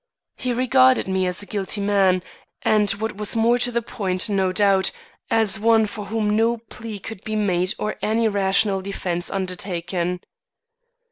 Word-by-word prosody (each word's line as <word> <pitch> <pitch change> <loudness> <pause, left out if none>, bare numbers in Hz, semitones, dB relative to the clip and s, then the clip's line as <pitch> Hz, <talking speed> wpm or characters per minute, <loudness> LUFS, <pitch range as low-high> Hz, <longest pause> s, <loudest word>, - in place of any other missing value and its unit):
He 250 - -3
regarded 255 0 +3
me 190 -1 0
as 180 +3 -1
a - - -10
guilty 200 +1 -3
man, 195 -3 +2 0.4
and 210 -1 +3
what 220 0 -1
was 210 +1 -1
more 230 +2 +3
to 245 - +1
the 235 0 -1
point 190 -2 -2
no 190 -2 +1
doubt, 195 -1 +3 0.4
as 220 -3 +2
one 225 0 +4
for 210 0 -6
whom 215 +1 -1
no 225 +3 +2
plea 225 -1 -9
could 200 0 -9
be 215 - -4
made 185 -3 +1
or 210 - -3
any 225 +1 +1
rational 195 -1 +1
defence 180 -2 -3
undertaken. 180 -2 -3
205 Hz, 160 wpm, -22 LUFS, 190-225 Hz, 0.4 s, one